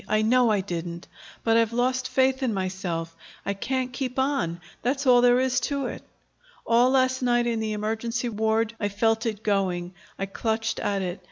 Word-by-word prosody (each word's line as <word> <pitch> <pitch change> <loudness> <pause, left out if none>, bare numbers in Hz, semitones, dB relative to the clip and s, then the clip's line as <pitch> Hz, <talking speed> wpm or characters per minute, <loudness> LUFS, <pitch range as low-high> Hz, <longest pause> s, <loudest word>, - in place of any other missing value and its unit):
"I 215 0 +2
know 245 +2 +4
I 210 -2 +2
didn't. 170 -2 -5 0.4
But 225 0 +3
I've 230 0 +2
lost 255 +2 +1
faith 265 0 +2
in 245 -5 0
myself. 185 -3 -3 0.3
I 200 - 0
can't 255 +5 -2
keep 255 -1 -4
on; 265 - 0 0.2
that's 270 +4 -1
all 245 -2 +6
there 245 0 +5
is 260 -1 +2
to 280 -2 -1
it. - - -5 0.6
All 240 +2 +4
last 260 0 +2
night, 240 -1 +2
in 230 -1 0
the 220 -1 -2
emergency 225 +3 -2
ward, 220 0 0
I 205 - 0
felt 225 +3 +1
it 215 -1 -4
going. 185 -3 0 0.2
I 195 - -2
clutched 225 +3 -2
at 200 -1 -1
it. 180 +1 -4
225 Hz, 185 wpm, -25 LUFS, 200-250 Hz, 0.6 s, all